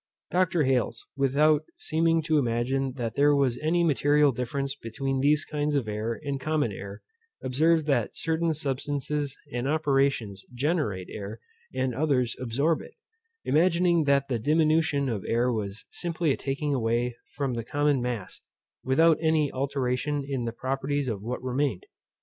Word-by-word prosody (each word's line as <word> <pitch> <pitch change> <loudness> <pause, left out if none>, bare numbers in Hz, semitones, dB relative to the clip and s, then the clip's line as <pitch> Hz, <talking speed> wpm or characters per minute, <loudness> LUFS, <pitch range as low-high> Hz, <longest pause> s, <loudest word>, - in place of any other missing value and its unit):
Dr. 175 -3 +2
Hales, 125 -4 0
without 145 +3 +3
seeming 165 - +1
to 155 0 +2
imagine 130 +2 0
that 120 -4 -3
there 145 +1 +4
was 135 -4 +1
any 170 +3 +1
material 145 -2 +4
difference 135 +3 -3
between 135 +2 -3
these 145 +2 +3
kinds 150 0 -1
of 135 -6 0
air 110 +2 -3
and 140 -2 -3
common 150 -4 0
air, 100 +1 -8 0.4
observed 155 +5 +2
that 135 -7 0
certain 165 0 0
substances 145 0 -3 0.2
and 120 +2 -2
operations 140 -9 +1
generate 120 - -1
air, 105 +2 -6 0.4
and 130 -1 0
others 130 -4 +1
absorb 140 +7 0
it; - - -13 0.5
imagining 170 0 +3
that 140 -1 +3
the 125 -4 -1
diminution 155 +1 +2
of 110 -6 -2
air 120 +2 +2
was 105 -2 -4
simply 170 -3 -1
a - - +2
taking 140 +2 -2
away 120 -1 0 0.2
from 140 -3 -1
the 115 -1 -3
common 145 +2 +1
mass, 120 -6 -4 0.4
without 160 +5 +4
any 160 -3 +2
alteration 140 +1 -1
in 135 -4 -2
the 115 - -2
properties 135 +3 -2
of 105 -5 -3
what 125 +4 -4
remained. 130 -5 -1
140 Hz, 150 wpm, -27 LUFS, 120-150 Hz, 0.5 s, there